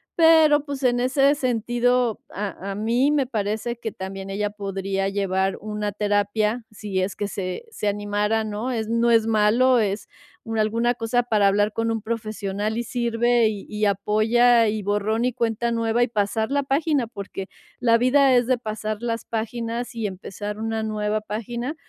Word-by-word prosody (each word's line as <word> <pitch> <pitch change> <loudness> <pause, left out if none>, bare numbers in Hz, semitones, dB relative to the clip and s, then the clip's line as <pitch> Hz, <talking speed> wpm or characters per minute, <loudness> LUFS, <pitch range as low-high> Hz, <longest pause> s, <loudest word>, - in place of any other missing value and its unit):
Pero, 320 -3 +6
pues, 280 -2 -5
en 245 -1 +3
ese 275 +2 +3
sentido, 245 -2 +1
a 200 -1 -5
a - - -4
mí 235 +7 +2
me 290 -3 +2
parece 220 +1 -2
que 225 -1 -5
también 190 0 -7
ella 205 +1 -1
podría 195 -1 -3
llevar 195 -1 0
una 210 0 -3
terapia, 210 +3 0
si 205 -2 -4
es 190 +2 -2
que 205 - -2
se 185 - -4
se 210 - -3
animara, 205 +2 0
¿no? 215 +4 -3
Es 225 -3 -2
no 230 +1 +2
es 225 -1 +4
malo, 225 +4 +4
es 205 -1 -1 0.4
una 225 -1 -1
alguna 230 +3 +1
cosa 235 +1 0
para 215 -4 +3
hablar 205 +2 +2
con 225 0 -1
un 225 -1 -2
profesional 215 -1 -3
y 240 - -1
sirve, 235 0 +1
y 205 -2 -6
y 210 0 -4
apoya, 220 +4 +3
y 215 0 -2
borrón 205 +3 0
y 250 - +1
cuenta 235 0 -1
nueva, 230 +1 +1
y - - +1
pasar 220 +2 -1
la 285 0 +1
página, 280 -1 +1
porque 200 -3 -7 0.3
la 230 -2 +4
vida 265 +2 +4
es 245 0 +4
de 255 -1 +2
pasar 215 -2 -4
las 230 -1 -2
páginas 230 +1 -3
y 225 -2 -3
empezar 205 +2 -6
una 225 0 -2
nueva 215 0 -1
página. 235 +6 -4
220 Hz, 175 wpm, -23 LUFS, 205-240 Hz, 0.4 s, Pero